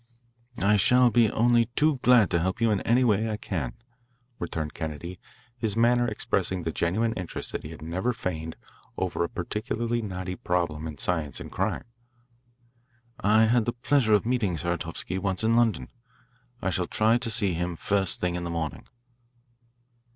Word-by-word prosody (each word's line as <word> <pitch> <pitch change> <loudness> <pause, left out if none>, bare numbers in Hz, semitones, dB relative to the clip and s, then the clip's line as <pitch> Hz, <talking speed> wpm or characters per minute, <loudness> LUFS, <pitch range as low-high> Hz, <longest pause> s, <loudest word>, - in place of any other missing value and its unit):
"I 105 +1 +4
shall 125 +5 +5
be 115 -2 +4
only 120 +1 +3
too 150 -1 +3
glad 125 -5 +5
to 85 - +2
help 95 +3 -1
you 115 -1 +3
in 100 - +1
any 125 +3 +3
way 110 -1 +2
I 105 - -2
can," 80 - -3 0.7
returned 80 -3 -4
Kennedy, 80 +3 -6 0.4
his 110 -2 -1
manner 120 +1 +4
expressing 95 -4 -1
the 80 - -2
genuine 110 +9 0
interest 90 -6 -5
that - - -4
he 80 +2 -8
never 85 +10 -2
feigned 80 -7 -4 0.4
over - - -1
a 85 - -2
particularly 115 +5 -2
knotty 95 -3 -4
problem 85 -4 -1
in 75 -2 -7
science 80 -2 -1
and - - -8
crime. - - -1 1.4
"I 110 +2 +4
had 115 0 +3
the 120 - -1
pleasure 120 -2 +3
of 105 - +1
meeting 115 -8 0
Saratovsky 85 +2 -2
once 95 0 -2
in 115 +1 +3
London. 120 -2 +2 0.7
I 95 - +1
shall 90 0 -1
try 110 +2 +2
to 120 -1 -1
see 105 -4 +2
him 90 +1 -2
the - - -10
first 95 +3 0
thing 90 -1 -1
in 90 0 -3
the 85 - -4
morning." 80 -4 -4
100 Hz, 170 wpm, -27 LUFS, 85-115 Hz, 1.4 s, shall